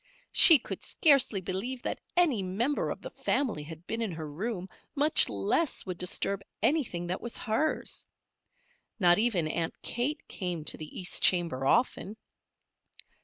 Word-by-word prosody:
She 330 Hz, -4 st, +9 dB
could 250 Hz, -, -8 dB
scarcely 275 Hz, -, +3 dB
believe 215 Hz, +8 st, -4 dB
that -, -, -4 dB, 0.2 s
any 305 Hz, -, +3 dB
member 220 Hz, +10 st, -1 dB
of -, -, -6 dB
the -, -, -8 dB
family 255 Hz, -, -1 dB
had 160 Hz, +2 st, -11 dB
been 225 Hz, +4 st, -4 dB
in 215 Hz, -6 st, -2 dB
her 160 Hz, -1 st, -6 dB
room, 185 Hz, +5 st, -5 dB, 0.3 s
much 295 Hz, +2 st, +4 dB
less 105 Hz, -, -1 dB
would 185 Hz, -2 st, -6 dB
disturb 195 Hz, +2 st, 0 dB, 0.2 s
anything 250 Hz, -, 0 dB
that 180 Hz, +2 st, -4 dB
was 235 Hz, -, -5 dB
hers. 230 Hz, +8 st, -2 dB, 1.0 s
Not 175 Hz, -1 st, +4 dB
even 205 Hz, -8 st, +1 dB
Aunt 165 Hz, +1 st, -3 dB
Kate 280 Hz, +6 st, -3 dB
came 175 Hz, -5 st, -4 dB
to -, -, +3 dB
the 155 Hz, -1 st, -8 dB
east 180 Hz, -1 st, +2 dB
chamber 165 Hz, -8 st, +2 dB
often. 220 Hz, -, 0 dB
195 Hz, 150 wpm, -29 LUFS, 175-255 Hz, 1.0 s, She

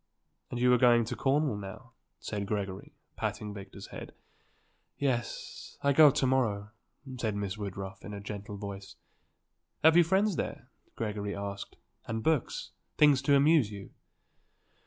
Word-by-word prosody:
"And 125 Hz, -, -4 dB
you 125 Hz, 0 st, +5 dB
are 125 Hz, -, +4 dB
going 120 Hz, -2 st, +5 dB
to -, -, -4 dB
Cornwall, 140 Hz, -4 st, +1 dB
now?" 100 Hz, -1 st, -9 dB, 0.3 s
said 100 Hz, -1 st, -4 dB
Gregory, 100 Hz, -2 st, -4 dB, 0.2 s
patting 105 Hz, -1 st, -3 dB
Victor's 100 Hz, -1 st, -9 dB
head. -, -, -9 dB, 0.8 s
"Yes; 125 Hz, -4 st, -3 dB
I 140 Hz, 0 st, +4 dB
go 150 Hz, +1 st, +9 dB
to 135 Hz, -, +1 dB
morrow," 110 Hz, -6 st, +1 dB, 0.5 s
said 110 Hz, -4 st, -1 dB
Miss 100 Hz, -1 st, -2 dB
Woodruff 95 Hz, -2 st, -6 dB
in 105 Hz, -, -7 dB
a 100 Hz, -, -5 dB
gentle 100 Hz, +1 st, -7 dB
voice. 100 Hz, -1 st, -7 dB, 0.9 s
"Have 160 Hz, +1 st, +7 dB
you 175 Hz, -, +8 dB
friends 190 Hz, +3 st, +2 dB
there?" -, -, -4 dB, 0.3 s
Gregory 105 Hz, -2 st, -3 dB
asked, 100 Hz, 0 st, -6 dB, 0.3 s
"and 110 Hz, -1 st, -3 dB
books? 160 Hz, -5 st, 0 dB, 0.3 s
Things 145 Hz, -3 st, +6 dB
to 140 Hz, +1 st, +4 dB
amuse 145 Hz, -4 st, +5 dB
you?" 100 Hz, -2 st, -9 dB
110 Hz, 145 wpm, -30 LUFS, 100-140 Hz, 0.9 s, go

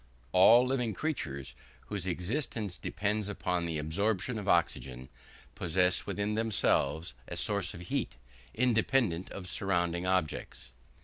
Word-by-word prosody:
All 115 Hz, +7 st, +7 dB
living 125 Hz, -5 st, -1 dB
creatures, 70 Hz, -, -3 dB, 0.3 s
whose 100 Hz, -3 st, -4 dB
existence 100 Hz, -, -2 dB
depends 105 Hz, +2 st, -1 dB
upon 90 Hz, -4 st, -1 dB
the 80 Hz, -2 st, -2 dB
absorption 100 Hz, +8 st, 0 dB
of 100 Hz, -, -7 dB
oxygen, 65 Hz, -8 st, 0 dB, 0.4 s
possess 90 Hz, +2 st, +1 dB
within 105 Hz, +1 st, -1 dB
themselves 100 Hz, -6 st, +1 dB
a -, -, -5 dB
source 100 Hz, -3 st, 0 dB
of 85 Hz, -, -9 dB
heat, 90 Hz, -, -2 dB, 0.4 s
independent 115 Hz, -6 st, +2 dB
of 90 Hz, -2 st, -7 dB
surrounding 85 Hz, -2 st, 0 dB
objects. 80 Hz, -8 st, -2 dB
95 Hz, 120 wpm, -31 LUFS, 85-110 Hz, 0.4 s, All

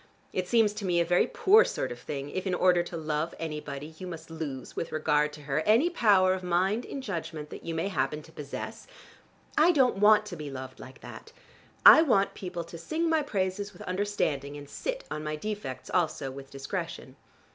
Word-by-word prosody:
It 185 Hz, -1 st, -1 dB
seems 220 Hz, -1 st, +3 dB
to 210 Hz, -, -6 dB
me 175 Hz, -2 st, +2 dB
a 170 Hz, -, +3 dB
very 175 Hz, +1 st, +3 dB
poor 425 Hz, +4 st, +5 dB
sort 130 Hz, -, -3 dB
of 120 Hz, -, -7 dB
thing 140 Hz, 0 st, -5 dB
if 185 Hz, +1 st, -3 dB
in 185 Hz, -, +1 dB
order 180 Hz, -1 st, +4 dB
to 175 Hz, 0 st, -6 dB
love 155 Hz, +1 st, -2 dB
anybody 150 Hz, -1 st, -6 dB
you 185 Hz, -, -6 dB
must 165 Hz, -2 st, -8 dB
lose, 150 Hz, -5 st, -6 dB
with 165 Hz, -, -4 dB
regard 150 Hz, -1 st, +1 dB
to 150 Hz, -, -10 dB
her, 140 Hz, +1 st, 0 dB
any 225 Hz, -, +3 dB
power 200 Hz, -, +4 dB
of 190 Hz, -, -3 dB
mind 185 Hz, +6 st, +1 dB
and 275 Hz, -, -6 dB
judgment 160 Hz, -, -5 dB
that -, -, -9 dB
you 165 Hz, -, -4 dB
may 165 Hz, +4 st, -1 dB
happen 155 Hz, -6 st, -1 dB
to -, -, -16 dB
possess. 145 Hz, -2 st, -7 dB, 0.7 s
I 330 Hz, +3 st, +6 dB
don't 265 Hz, -, +3 dB
want 210 Hz, +1 st, +6 dB
to 205 Hz, -4 st, -6 dB
be 150 Hz, -3 st, -6 dB
loved 130 Hz, -1 st, -8 dB
like 130 Hz, +1 st, -12 dB
that. -, -, -11 dB, 0.5 s
I -, -, +11 dB
want 200 Hz, -11 st, +3 dB
people 180 Hz, -2 st, -5 dB
to 170 Hz, 0 st, -10 dB
sing 325 Hz, -, -1 dB
my 320 Hz, -1 st, +3 dB
praises 200 Hz, -4 st, -2 dB
with 175 Hz, -, -11 dB
understanding, 180 Hz, -8 st, -2 dB
and 145 Hz, 0 st, -10 dB
sit -, -, -4 dB
on 150 Hz, -, -4 dB
my 155 Hz, 0 st, -2 dB
defects 155 Hz, -8 st, -5 dB
also 160 Hz, -6 st, 0 dB
with 135 Hz, 0 st, -10 dB
discretion. 165 Hz, 0 st, -5 dB
175 Hz, 205 wpm, -28 LUFS, 150-205 Hz, 0.7 s, I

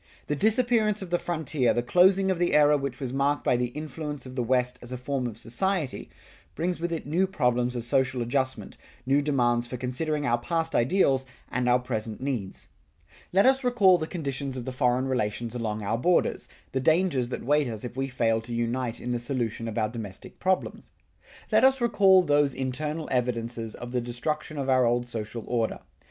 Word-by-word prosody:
The 150 Hz, -, -1 dB
disappearance 220 Hz, -, +2 dB
of 180 Hz, -, -9 dB
the 175 Hz, -, +2 dB
frontier, 155 Hz, -7 st, 0 dB
the 120 Hz, -, 0 dB
closing 190 Hz, +7 st, +4 dB
of 180 Hz, -, -2 dB
the 175 Hz, -3 st, +2 dB
era 150 Hz, 0 st, +6 dB
which 135 Hz, -3 st, -3 dB
was 130 Hz, -3 st, -4 dB
marked 140 Hz, +2 st, +1 dB
by -, -, +3 dB
the 125 Hz, 0 st, 0 dB
influence 150 Hz, +1 st, -6 dB
of 130 Hz, 0 st, -9 dB
the 125 Hz, -, 0 dB
West 125 Hz, +1 st, 0 dB
as 120 Hz, -, -9 dB
a 125 Hz, -, -3 dB
form 130 Hz, 0 st, -2 dB
of 110 Hz, -3 st, -7 dB
society, 150 Hz, +7 st, -2 dB, 0.5 s
brings 175 Hz, +1 st, -1 dB
with 170 Hz, +1 st, -2 dB
it 165 Hz, -, -3 dB
new 175 Hz, +6 st, +1 dB
problems 125 Hz, -7 st, 0 dB
of 120 Hz, -, -3 dB
social 130 Hz, +1 st, +1 dB
adjustment, 130 Hz, +2 st, -2 dB, 0.3 s
new 140 Hz, +2 st, +3 dB
demands 120 Hz, -4 st, +1 dB
for 125 Hz, -, -5 dB
considering 145 Hz, +5 st, -2 dB
our 120 Hz, -2 st, +2 dB
past 165 Hz, +5 st, -1 dB
ideals 135 Hz, -1 st, +2 dB, 0.2 s
and 125 Hz, 0 st, 0 dB
our 125 Hz, -, +5 dB
present 110 Hz, -3 st, -4 dB
needs. 125 Hz, -8 st, -4 dB, 0.6 s
Let 195 Hz, +2 st, +4 dB
us 265 Hz, +1 st, +4 dB
recall 205 Hz, -8 st, +5 dB
the 155 Hz, -, -3 dB
conditions 140 Hz, -6 st, -4 dB
of 120 Hz, -, -5 dB
the 130 Hz, -, -3 dB
foreign 125 Hz, 0 st, +1 dB
relations 120 Hz, -2 st, -2 dB
along 110 Hz, -3 st, -3 dB
our 110 Hz, +3 st, -1 dB
borders, 175 Hz, +6 st, +1 dB, 0.2 s
the 130 Hz, -, -1 dB
dangers 155 Hz, -3 st, +2 dB
that -, -, -5 dB
wait 145 Hz, +1 st, +3 dB
us 110 Hz, -3 st, -5 dB
if 125 Hz, -1 st, -6 dB
we 135 Hz, 0 st, -1 dB
fail 115 Hz, -3 st, +1 dB
to 120 Hz, +1 st, -6 dB
unite 120 Hz, 0 st, -2 dB
in 125 Hz, -, -4 dB
the 120 Hz, -, 0 dB
solution 120 Hz, -3 st, -2 dB
of 110 Hz, -, -5 dB
our 110 Hz, -1 st, +1 dB
domestic 110 Hz, -4 st, -8 dB
problems. 185 Hz, 0 st, -1 dB, 0.6 s
Let -, -, +4 dB
us 265 Hz, 0 st, +5 dB
recall 195 Hz, -6 st, +5 dB
those 145 Hz, -3 st, +2 dB
internal 150 Hz, +4 st, -3 dB
evidences 115 Hz, -2 st, -2 dB
of 120 Hz, 0 st, -8 dB
the 125 Hz, -1 st, 0 dB
destruction 150 Hz, +6 st, -3 dB
of 135 Hz, -1 st, -2 dB
our 130 Hz, -1 st, +4 dB
old 120 Hz, +1 st, +1 dB
social 115 Hz, -1 st, -5 dB
order. 115 Hz, -2 st, -1 dB
130 Hz, 200 wpm, -27 LUFS, 120-155 Hz, 0.6 s, era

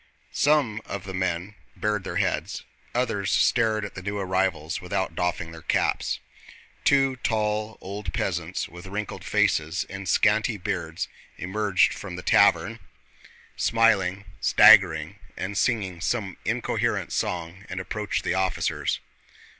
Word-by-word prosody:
Some 140 Hz, -8 st, +2 dB
of 100 Hz, -, -5 dB
the 95 Hz, -, -7 dB
men 95 Hz, +1 st, -2 dB, 0.2 s
bared 105 Hz, -2 st, -1 dB
their -, -, -4 dB
heads, -, -, -1 dB, 0.3 s
others 110 Hz, -5 st, 0 dB
stared 110 Hz, -3 st, +2 dB
at 105 Hz, -, -8 dB
the 95 Hz, -, -7 dB
new 100 Hz, +2 st, -3 dB
arrivals 95 Hz, -4 st, -1 dB
without 90 Hz, -1 st, -2 dB
doffing 90 Hz, 0 st, -2 dB
their 80 Hz, 0 st, -10 dB
caps. -, -, 0 dB, 0.6 s
Two 135 Hz, -2 st, +3 dB
tall 110 Hz, -2 st, -1 dB
old 100 Hz, +2 st, -5 dB
peasants 85 Hz, -1 st, -2 dB
with 85 Hz, +2 st, -11 dB
wrinkled 100 Hz, +2 st, -5 dB
faces 80 Hz, +5 st, +1 dB
and 100 Hz, -2 st, -5 dB
scanty 110 Hz, +1 st, +3 dB
beards 90 Hz, -, -3 dB, 0.3 s
emerged 100 Hz, +1 st, +2 dB
from 95 Hz, -3 st, -7 dB
the 90 Hz, -, -7 dB
tavern, -, -, +4 dB, 0.8 s
smiling, 105 Hz, -4 st, +2 dB
staggering, -, -, +6 dB, 0.2 s
and 100 Hz, +2 st, -4 dB
singing 95 Hz, -4 st, 0 dB
some 100 Hz, -2 st, -1 dB
incoherent -, -, -1 dB
song, 90 Hz, +2 st, -3 dB
and 95 Hz, 0 st, -4 dB
approached 105 Hz, +3 st, -3 dB
the -, -, 0 dB
officers. 95 Hz, -1 st, 0 dB
95 Hz, 130 wpm, -25 LUFS, 90-105 Hz, 0.8 s, staggering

